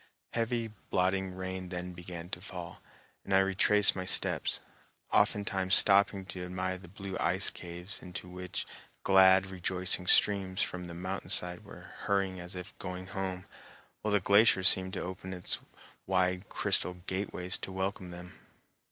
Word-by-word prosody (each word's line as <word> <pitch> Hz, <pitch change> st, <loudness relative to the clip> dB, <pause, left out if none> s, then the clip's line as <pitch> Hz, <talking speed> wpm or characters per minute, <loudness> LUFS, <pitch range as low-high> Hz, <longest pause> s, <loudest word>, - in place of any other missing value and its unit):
Heavy, 115 Hz, 0 st, 0 dB, 0.2 s
blotting 95 Hz, 0 st, 0 dB
rain 95 Hz, 0 st, -5 dB
then 90 Hz, 0 st, -5 dB
began 85 Hz, -1 st, -8 dB
to 90 Hz, -1 st, -5 dB
fall, 90 Hz, -3 st, -8 dB, 0.4 s
and 95 Hz, -, 0 dB
I -, -, +7 dB
retraced 95 Hz, +1 st, +4 dB
my 95 Hz, -, -3 dB
steps, 90 Hz, -, +2 dB, 0.5 s
oftentimes 95 Hz, -2 st, +2 dB
stopping 100 Hz, -1 st, +5 dB
to 90 Hz, -1 st, -6 dB
admire 95 Hz, +1 st, -3 dB
the 90 Hz, -, -13 dB
blue 95 Hz, +1 st, -7 dB
ice 90 Hz, +3 st, +2 dB
caves 90 Hz, +2 st, -7 dB
into 90 Hz, 0 st, -7 dB
which 90 Hz, 0 st, -5 dB, 0.4 s
glad, 95 Hz, 0 st, +6 dB
rejoicing 90 Hz, 0 st, 0 dB
streams 95 Hz, -2 st, +5 dB
from 90 Hz, -1 st, -5 dB
the 85 Hz, -, -8 dB
mountain 90 Hz, +1 st, -5 dB
side 90 Hz, -2 st, -1 dB
were -, -, -13 dB
hurrying 95 Hz, -2 st, 0 dB
as 90 Hz, +1 st, -8 dB
if 90 Hz, +3 st, -8 dB
going 90 Hz, -1 st, -5 dB
home, 95 Hz, -2 st, -3 dB, 0.6 s
while 105 Hz, -1 st, -1 dB
the -, -, +4 dB
glacier 100 Hz, 0 st, +4 dB
seemed 95 Hz, 0 st, +5 dB
to -, -, -3 dB
open 95 Hz, 0 st, -7 dB, 0.6 s
wide 90 Hz, -1 st, +2 dB
its 95 Hz, -, -17 dB
crystal 90 Hz, -, 0 dB
gateways 90 Hz, 0 st, -3 dB
to -, -, -6 dB
welcome 95 Hz, -1 st, -3 dB
them. 90 Hz, +1 st, -9 dB
95 Hz, 150 wpm, -31 LUFS, 90-95 Hz, 0.6 s, I